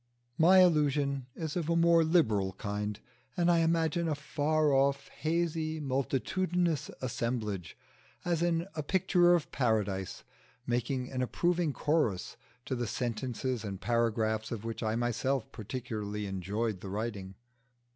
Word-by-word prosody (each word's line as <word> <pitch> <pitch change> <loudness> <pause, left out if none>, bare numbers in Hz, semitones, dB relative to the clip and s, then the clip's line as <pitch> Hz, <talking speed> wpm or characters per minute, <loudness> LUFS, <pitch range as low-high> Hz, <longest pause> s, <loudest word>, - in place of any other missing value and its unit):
My 185 +3 +7
illusion 145 -5 +2
is 160 -3 -4
of 170 -3 -2
a 170 - +2
more 170 0 +5
liberal 110 - +2
kind, 105 +1 -4 0.4
and 175 0 +4
I 170 - +4
imagine 165 0 +1
a 155 - 0
far 150 0 +1
off, 135 0 +2
hazy, 160 -1 -1
multitudinous 155 +5 0
assemblage, 115 -7 -3 0.5
as 170 -2 +1
in 170 0 +1
a 155 - -3
picture 175 +2 +4
of 170 - -2
Paradise, 105 -7 -1 0.4
making 125 +1 -1
an 130 -1 -2
approving 170 +5 +1
chorus 145 - 0 0.3
to - - -3
the 120 -1 -2
sentences 125 +1 -2
and 100 -3 -5
paragraphs 110 -1 0
of 115 -2 -5
which 115 0 -4
I 110 -1 0
myself 120 +2 -1
particularly 105 -3 -4
enjoy 100 +4 -2
the 95 0 -9
writing. 100 -2 -4
130 Hz, 135 wpm, -31 LUFS, 110-160 Hz, 0.5 s, My